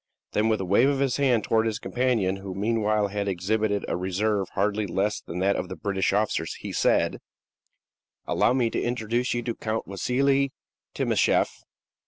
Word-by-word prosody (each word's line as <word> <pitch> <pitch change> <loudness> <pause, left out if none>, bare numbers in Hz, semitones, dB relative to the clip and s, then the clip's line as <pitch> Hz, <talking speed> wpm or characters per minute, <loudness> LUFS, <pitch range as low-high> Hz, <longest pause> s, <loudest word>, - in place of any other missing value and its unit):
Then, 110 +1 +1
with 110 - +1
a 95 - -2
wave 100 +9 +4
of 140 - +1
his 135 -2 +1
hand 130 -6 +2
towards 110 0 +2
his 110 -1 -1
companion, 115 -7 0
who 95 -1 -7
meanwhile 105 0 +1
had 100 0 -2
exhibited 100 +3 0
a - - -1
reserve 95 +2 0
hardly 105 +1 0
less 100 +3 -1
than 85 - -7
that 100 +1 +3
of 90 - -3
the 95 - -5
British 100 -1 0
officers, 100 -5 0
he - - -7
said: - - +2 1.1
"Allow - - +2
me 120 -3 +1
to - - -1
introduce 120 +1 -1
you 120 - -2
to 115 -1 -2
Count 110 0 -3
Wassili 135 +7 +1 0.4
Timascheff." - - +2
110 Hz, 175 wpm, -26 LUFS, 100-120 Hz, 1.1 s, wave